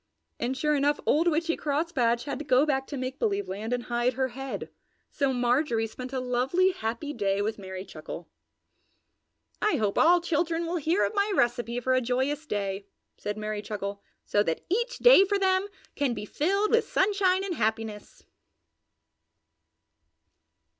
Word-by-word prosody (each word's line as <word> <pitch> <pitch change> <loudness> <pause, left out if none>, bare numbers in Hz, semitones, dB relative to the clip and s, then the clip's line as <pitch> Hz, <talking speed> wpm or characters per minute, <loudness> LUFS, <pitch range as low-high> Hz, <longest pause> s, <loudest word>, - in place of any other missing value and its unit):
And, 250 +3 -2
sure 300 +2 +1
enough, 290 +1 +2
old 325 +4 +3
Witchy 330 0 +1
Crosspatch 280 -6 0
had 280 -2 -4
to - - -4
go 265 0 +4
back 270 -3 0
to 285 - -5
Make 255 +1 -4
Believe 405 -3 0
Land 210 +4 -5
and 245 -1 -1
hide 240 +1 0
her 260 +1 -1
head, 270 +2 -6 0.4
so 275 -2 +1
Marjorie 245 -1 +1
spent 250 +3 -8
a 265 - -2
lovely, 255 +10 +2
happy 265 -2 -4
day 200 -4 0
with 215 +1 -2
Merry 190 -1 -7
Chuckle. 160 -1 -8 1.3
"I 425 - +2
hope 210 -3 0
all 350 +2 +6
children 335 0 0
will 345 +1 -1
hear 330 +5 +2
of - - -3
my 405 0 +1
recipe 240 -2 +1
for 255 +1 +1
a 255 - +3
joyous 265 +5 -1
day," 200 -2 -3 0.3
said 210 0 -4
Merry 215 -1 -3
Chuckle, 200 -1 -5 0.2
"so 205 - +2
that 165 -6 -2
each 475 +6 0
day - - +8
for 400 +1 +1
them 380 0 +2 0.3
can 270 -4 0
be - - -5
filled 395 - 0
with 460 +1 +3
sunshine 385 -1 +2
and 390 -2 -2
happiness!" 220 -4 -3
265 Hz, 165 wpm, -27 LUFS, 225-335 Hz, 1.3 s, day